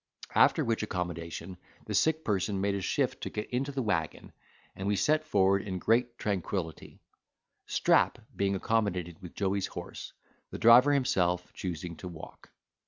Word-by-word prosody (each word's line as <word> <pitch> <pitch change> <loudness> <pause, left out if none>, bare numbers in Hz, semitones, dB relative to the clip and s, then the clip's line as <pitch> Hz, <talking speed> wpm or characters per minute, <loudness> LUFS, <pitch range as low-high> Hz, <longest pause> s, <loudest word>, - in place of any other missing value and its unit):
After - - +4
which 115 -1 0
accommodation, 90 -2 -4 0.3
the - - -4
sick 160 0 +2
person 100 -1 0
made 100 +1 +1
a 100 - -2
shift - - -1
to - - -3
get 105 - -5
into 135 +3 -1
the 135 -2 -2
waggon, 90 -8 -2 0.4
and 95 - -4
we 105 - +2
set 155 +8 +2
forward 100 -9 +3
in 95 -2 -4
great 120 +5 +1
tranquillity; 95 -4 -3 0.7
Strap - - +3 0.2
being 100 0 +1
accommodated 95 -5 -1
with 90 -2 -10
Joey's 100 -1 0
horse, - - -8 0.4
the - - -6
driver 120 +5 +7
himself 90 -10 +1
choosing 90 -1 -5
to 95 - -8
walk. 85 -3 -11
100 Hz, 155 wpm, -30 LUFS, 90-115 Hz, 0.7 s, driver